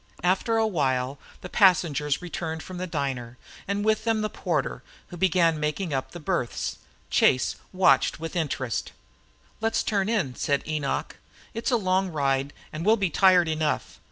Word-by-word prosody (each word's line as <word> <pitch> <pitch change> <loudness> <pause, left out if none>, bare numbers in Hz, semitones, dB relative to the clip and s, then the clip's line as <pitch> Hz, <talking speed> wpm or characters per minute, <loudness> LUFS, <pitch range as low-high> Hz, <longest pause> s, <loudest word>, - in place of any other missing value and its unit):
After 190 +5 +2
a 225 - +3
while 135 -8 0 0.2
the - - -6
passengers 165 -6 +3
returned 160 -2 -4
from 185 -1 -8
the 185 - -3
diner, 130 -6 -3 0.3
and 200 +1 -1
with 220 0 +2
them 225 -2 +1
the 215 - -2
porter, - - -2 0.3
who 175 - -8
began 170 -3 +3
making 150 +2 -2
up 135 -1 -2
the 175 - -9
berths. 165 -7 -2 0.3
Chase 130 - +3
watched 180 -8 +4
him - - -16
with 165 +2 -5
interest. 135 -7 -2 0.7
"Let's 225 +1 0
turn 200 -1 0
in," 190 - 0
said 140 +2 0
Enoch. 155 -3 -2 0.4
"It's 230 +2 -2
a 245 - +3
long 190 -2 +1
ride 140 -3 0 0.2
and 155 +1 -4
we'll 220 +4 +4
be 195 -5 0
tired 185 -3 +5
enough. 155 -1 -1
170 Hz, 165 wpm, -26 LUFS, 145-195 Hz, 0.7 s, tired